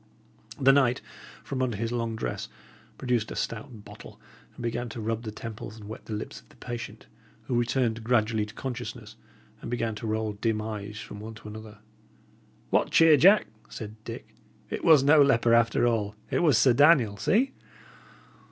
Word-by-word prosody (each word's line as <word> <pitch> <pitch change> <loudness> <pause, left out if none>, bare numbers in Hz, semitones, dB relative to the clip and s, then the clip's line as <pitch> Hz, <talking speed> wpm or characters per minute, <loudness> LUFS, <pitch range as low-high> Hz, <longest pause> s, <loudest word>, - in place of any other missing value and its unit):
The 135 0 +6
knight, 130 -2 +3 0.4
from 135 -2 -4
under 120 -5 -1
his 115 +2 -2
long 115 -2 -2
dress, 60 - -4 0.5
produced 120 -4 -1
a - - -6
stout 110 -1 -5
bottle, - - -12 0.4
and - - -9
began 120 +1 -2
to 115 - -7
rub 115 +1 -2
the 110 -2 -6
temples 110 0 -8
and 105 -2 -11
wet 110 - -9
the 110 - -6
lips 105 - -7
of - - -29
the - - -20
patient, 115 -2 -7 0.4
who 120 - -4
returned 120 -1 0
gradually 110 -2 +1
to 105 - -12
consciousness, 125 -2 -6 0.5
and - - -7
began 115 -2 -1
to 105 +1 -6
roll 110 0 -1
dim 110 +1 -1
eyes 105 -1 -6
from 105 - -9
one 110 +1 -8
to 110 - -12
another. 110 0 -10 0.9
"What - - +2
cheer, 165 -1 +6
Jack!" 195 +9 +6 0.2
said 110 -1 -8
Dick. - - -9 0.4
"It - - -4
was 155 -5 +6
no 145 +2 +6
leper, 120 -4 +4
after 115 0 +3
all; 110 -3 0 0.2
it - - +1
was 150 -8 +4
Sir 130 - +5
Daniel! 130 -7 +5
See!" 245 - +2
115 Hz, 180 wpm, -27 LUFS, 110-125 Hz, 0.9 s, The